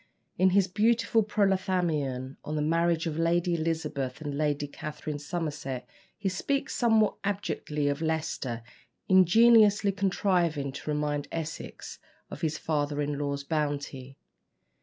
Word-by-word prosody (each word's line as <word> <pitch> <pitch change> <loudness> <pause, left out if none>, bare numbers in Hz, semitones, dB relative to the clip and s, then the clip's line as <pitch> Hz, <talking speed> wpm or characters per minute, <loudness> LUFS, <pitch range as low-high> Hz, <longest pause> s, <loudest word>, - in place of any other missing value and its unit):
In 185 +1 +4
his 190 0 +3
beautiful 225 +3 +2
"Prothalamion" 180 -10 0
on 155 - -4
the 150 - 0
marriage 165 +1 +1
of 160 -1 -2
Lady 175 +1 +2
Elizabeth 155 -5 -2
and 145 -2 -4
Lady 145 0 0
Catherine 150 +1 -6
Somerset, 145 -5 -4 0.3
he 200 - -3
speaks 275 +9 -1
somewhat 225 -4 +3
abjectly 190 -7 -2
of 145 +2 -1
Leicester, 155 -7 -2 0.4
ingeniously 205 +2 +6
contriving 180 -7 0
to 140 +3 -7
remind 150 -1 -1
Essex 165 -1 -6 0.3
of - - -8
his 155 -1 -1
father 145 -2 -1
in 145 -1 -1
law's 140 -1 -2
bounty. 145 -3 -3
160 Hz, 125 wpm, -28 LUFS, 145-190 Hz, 0.4 s, ingeniously